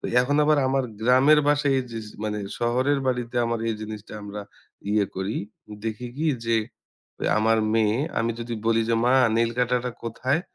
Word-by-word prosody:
তো - - -25 0.2
এখন 140 +3 +1
আবার 150 0 +4
আমার 135 -1 +1 0.2
গ্রামের 130 +6 +5
বাসায় 145 -2 +3
এইযে 125 - -3 0.2
যে - - -13
মানে 105 0 -2 0.2
শহরের 130 +4 +1
বাড়িতে 125 -1 -2
আমার 115 0 -1
এই 110 - 0
জিনিসটা 110 -1 -8
আমরা 105 0 -6 0.5
ইয়ে 105 -2 +2
করি। 95 +3 -2 0.5
দেখি 110 +3 -4
কি? 160 - 0 0.2
যে 115 -1 +3 0.8
আমার 110 +1 +3 0.2
মেয়ে 110 0 +3 0.2
আমি 115 0 0
যদি 115 0 -4
বলি 115 0 +3
যে, - - +3
"মা 125 - +4 0.2
নেইল 115 0 +2
কাটারটা 125 0 +1
কোথায়?" 130 +6 -1
120 Hz, 170 wpm, -25 LUFS, 110-130 Hz, 0.8 s, গ্রামের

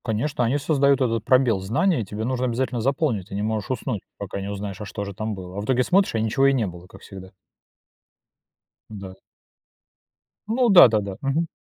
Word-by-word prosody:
Конечно, 125 +5 -1
они 125 +5 +1
создают 140 -2 +2
этот 115 -4 0
пробел 125 -6 +3
знаний, 115 - 0
тебе 105 +2 -6
нужно 130 0 -1
обязательно 125 0 -2
заполнить, 130 - -1
ты 100 - -8
не 100 - -2
можешь 110 -2 -2
уснуть, 125 -5 -3 0.2
пока 100 0 -6
не 100 - -5
узнаешь, 100 -1 -6
а - - -5
что 100 0 -5
же 100 0 -7
там 110 +2 -4
было. 90 0 -9
А - - -2
в - - -6
итоге 125 +1 +2
смотришь, 190 0 +2
а - - +1
ничего 110 +5 +2
и 135 - +3
не 125 -5 0
было, 90 -1 -9
как 95 +1 -16
всегда. 95 -1 -11 1.6
Да. 100 -3 -9 1.3
Ну 240 +2 +2
да-да-да. 110 - +5
Мгм. 145 +5 0
110 Hz, 190 wpm, -23 LUFS, 100-135 Hz, 1.6 s, да-да-да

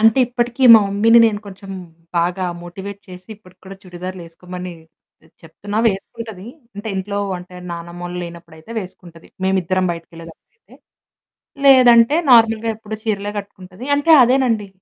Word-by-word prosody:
అంటే 225 +3 +4
ఇప్పటికి 240 +1 -3
మా 220 - +8
మమ్మీని 225 +4 +4
నేను 210 -2 -2
కొంచెం 195 0 -11 0.5
బాగా 180 +2 -1 0.2
మోటివేట్ 190 +3 -9
చేసి 185 +2 -13
ఇప్పటికి 185 -3 -22
కూడా 195 0 -10
చుడిదార్‌లేసుకోమని 180 0 -9 0.5
ఆహ్, 160 - -24
చెప్తున్నా 205 +6 -6
వేసుకుంటది. 215 0 -7 0.3
అంటే 215 +2 -6
ఇంట్లో 200 +2 -3 0.2
అంటే 180 0 -13 0.2
నానమ్మోళ్ళు 175 +1 -7
లేనప్పుడైతే 170 +2 -13
వేసుకుంటది. 180 -3 -13 0.2
మేము 190 0 +1
ఇద్దరం 185 +2 -1
బయటికేళ్ళేతప్పుడుయితే. 165 - -14 0.9
లేదంటే 250 0 +6 0.2
నార్మల్‌గా 225 -1 +4
ఎప్పుడు 220 0 -8
చీరలే 205 -2 -2
కట్టుకుంటది. 190 +2 -12
అంటే 290 +3 +2
అదేనండి 240 -5 +1
195 Hz, 125 wpm, -18 LUFS, 180-225 Hz, 0.9 s, మా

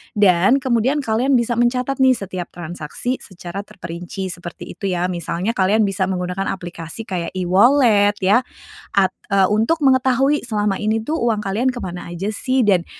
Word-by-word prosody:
Dan 205 +6 +4
kemudian 260 +3 +1
kalian 250 +4 +1
bisa 235 0 +1
mencatat 250 +3 0
nih 260 -1 +5
setiap 185 -5 -5
transaksi 175 - -4
secara 185 +1 -8
terperinci, 185 -1 -6
seperti 175 -1 -8 0.2
itu 200 - -2
ya. 180 0 -1
Misalnya 175 +4 -2
kalian 210 0 +2
bisa 195 -1 0
menggunakan 180 +1 -2
aplikasi 175 +2 -8
kayak 180 -4 -4
e-wallet 205 +3 +4
ya, 200 +6 +5 0.6
at 190 -1 +4 0.2
eee, 195 -1 +3
untuk 230 +9 +1
mengetahui 265 +1 +3
selama 210 -3 0
ini 220 +1 0
tuh 315 +7 -2
uang 220 -2 +1
kalian 220 +6 0
ke 245 - -6
mana 175 -1 -6
aja 190 +4 -3
sih. 255 +4 0
Dan 190 -6 +3
205 Hz, 160 wpm, -20 LUFS, 185-245 Hz, 0.6 s, nih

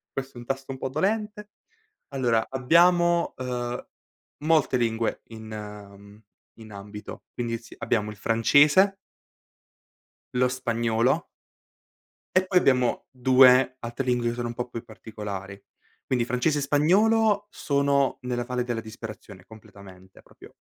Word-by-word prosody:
Questo 135 -2 -5
è - - -8
un 120 - -12
tasto 135 0 -4
un 130 - -6
po' 130 - -3
dolente. 210 +6 -2 0.6
Allora, 120 -5 0
abbiamo, 170 +6 +3
ehm, 125 -1 -4 0.5
molte 155 -4 +2
lingue 115 -1 -1
in 105 -2 -10 0.4
in 110 -1 -12
ambito. 105 +1 -9
Quindi, 115 -1 -3
sì, 115 - -15
abbiamo 105 -2 -1
il - - -11
francese 145 - +4 1.4
lo 125 0 +3
spagnolo 120 -1 0 1.1
e 185 0 +4
poi 185 -1 +3
abbiamo 125 -6 +1
2 130 0 +5
altre 120 +2 -5
lingue 125 -1 0
che - - -3
sono 120 -1 -3
un - - -5
po' 120 +1 -5
più 115 -1 -7
particolari. 105 -4 -8 0.4
Quindi 125 -2 0
francese 135 +5 0
e - - -2
spagnolo, 205 +9 +3
sono 140 -4 +1
nella 125 -1 -2
valle 125 0 -2
della 120 -2 -3
disperazione 110 -4 -10
completamente, 95 -4 -15
proprio - - -17
125 Hz, 130 wpm, -25 LUFS, 110-140 Hz, 1.4 s, 2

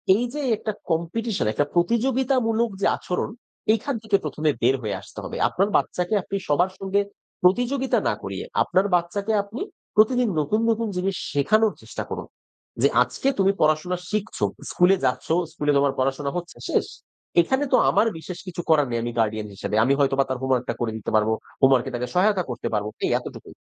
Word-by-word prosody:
এই 235 - 0
যে 295 - -3 0.2
একটা 215 - -3 0.2
কম্পিটিশন 175 - -1
,একটা 145 - +1
প্রতিযোগিতামূলক 235 +3 +2
যে - - +2
আচরণ, 180 +3 -3 0.4
এইখান 240 +4 -1
থেকে 215 -2 +2
প্রথমে 155 +1 -1
বের 130 +3 +4
হয়ে 105 -3 -2
আসতে - - -11
হবে। - - -5
আপনার 195 +3 +1
বাচ্চাকে 180 +4 -1
আপনি 200 - -5
সবার 175 +6 +2
সঙ্গে 195 +1 0 0.4
প্রতিযোগিতা 245 +8 +2
না - - +2
করিয়ে, - - -5 0.2
আপনার 190 +2 +2
বাচ্চাকে 200 +5 -1
আপনি 210 +5 -8 0.3
প্রতিদিন 240 +2 +4
নতুন, 180 +9 +1
নতুন 230 0 +1
জিনিস 190 +1 -1 0.2
শেখানোর 215 +9 +3
চেষ্টা - - -6
করুন। - - -5 0.5
যে - - +6 0.2
"আজকে 270 - -2
তুমি 195 0 +4
পড়াশোনা 155 +4 +2
শিখছো। 215 0 -1 0.3
স্কুলে 180 +2 +4
যাচ্ছো, 130 +5 0 0.2
স্কুলে 150 -2 0
তোমার 140 -1 +2
পড়াশোনা 135 +2 0
হচ্ছে," 175 0 -7
শেষ। - - +1 0.5
এখানে 265 +11 0
তো - - +7
আমার 225 - +3
বিশেষ 175 +2 -7
কিছু 175 -1 -4
করার 150 -4 +4
নেই, 120 -1 -1
আমি 120 - -2
গার্ডিয়ান 110 -1 0
হিসেবে। 100 +1 -4
আমি 135 - +3
হয়তোবা 135 -1 +3
তার 130 -1 -2
হোমওয়ার্কটা 130 -2 0
করে 115 -2 0
দিতে 110 - -5
পারবো, 110 +1 +3 0.3
হোমওয়ার্ক 135 -2 +5
এ - - -10
তাকে 125 +1 -2
সহায়তা 190 0 +3
করতে 125 - -4
পারব। 105 0 0 0.2
এই - - 0
এতটুকুই। - - -10
180 Hz, 175 wpm, -24 LUFS, 135-215 Hz, 0.5 s, তো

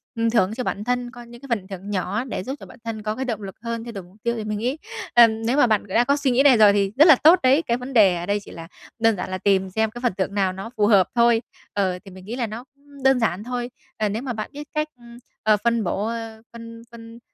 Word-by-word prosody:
ừm, 230 0 +1
thưởng 220 -3 +2
cho 250 - -3
bản 210 - -3
thân 245 +1 -2
có 245 -1 -11
những 235 0 -14
cái 275 - -11
phần 210 -6 -2
thưởng 195 0 -8
nhỏ 200 +3 -2
để 255 -7 -5
giúp 265 +7 -5
cho - - -10
bản - - -15
thân 225 -2 -5
có 215 0 -2
cái 265 +3 -3
động 225 -4 -3
lực 195 -2 -8
hơn, 230 -1 -4
thay 235 0 -8
đổi 195 -3 -7
mục 180 +2 -20
tiêu 235 - 0
thì 220 - -4
mình 210 0 -3
nghĩ, 250 +7 -2 0.4
ờm, 225 -2 +5
nếu 245 +5 +1
mà 270 - +5
bạn 215 -2 +1
đã 225 +5 +2
có 280 +3 +2
suy 280 -2 +1
nghĩ 250 +3 +3
này 270 -4 +6
rồi 210 -2 +7
thì 200 -1 +1
rất 300 - +8
là 315 - +9
tốt 320 +7 +6
đấy, 265 +4 +4
cái 235 -7 -1
vấn 255 +2 -8
đề 200 -6 +5
ở 170 0 -4
đây 205 +2 0
chỉ 205 - -14
là 165 0 -9 0.3
đơn 225 -1 +3
giản 185 -1 -5
là 185 - -3
tìm 190 0 +1
xem 220 +3 0
cái 240 +2 -9
phần 245 -4 0
thưởng 195 +1 -2
nào 195 -2 0
nó 195 +4 -7
phù 205 -1 +3
hợp 200 -4 +5
thôi. 235 -1 +4 0.3
Ờ, 190 -3 -1
thì 195 - -11
mình 185 0 -13
nghĩ 225 +4 -5
là 245 -2 -2
nó 220 +3 -7 0.4
đơn 265 -1 +4
giản 210 -4 -1
thôi. 245 0 -4 0.3
Ờ, 215 -1 0
nếu 215 +3 -3
mà 255 -2 -4
bạn 215 -1 -5
biết 295 +1 -8
cách, 305 0 -1 0.6
ờ, 215 -1 +4
phân 235 -1 +1
bổ, 195 +2 -2
ơ, 225 -1 -6
phân 230 0 -10
phân 230 0 -12
225 Hz, 290 wpm, -22 LUFS, 200-245 Hz, 0.6 s, là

